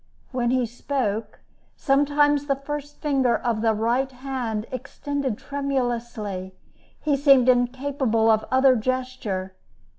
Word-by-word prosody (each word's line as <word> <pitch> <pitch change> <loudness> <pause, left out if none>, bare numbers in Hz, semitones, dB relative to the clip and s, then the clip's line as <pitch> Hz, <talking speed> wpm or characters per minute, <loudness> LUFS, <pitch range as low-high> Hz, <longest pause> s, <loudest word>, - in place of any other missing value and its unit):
When 245 -2 0
he 255 0 +2
spoke, 230 -2 -3 0.3
sometimes 290 +1 +2
the 275 - +2
first 290 +1 -6
finger 265 -6 +2
of 230 -3 -1
the 225 -1 +2
right 240 +5 0
hand 250 -4 -4
extended 275 -1 -3
tremulously; 240 -9 -3 0.4
he 295 -2 +1
seemed 275 -3 +5
incapable 250 -2 +2
of 220 0 +2
other 260 0 +5
gesture. 235 -6 -3
255 Hz, 115 wpm, -24 LUFS, 230-275 Hz, 0.4 s, seemed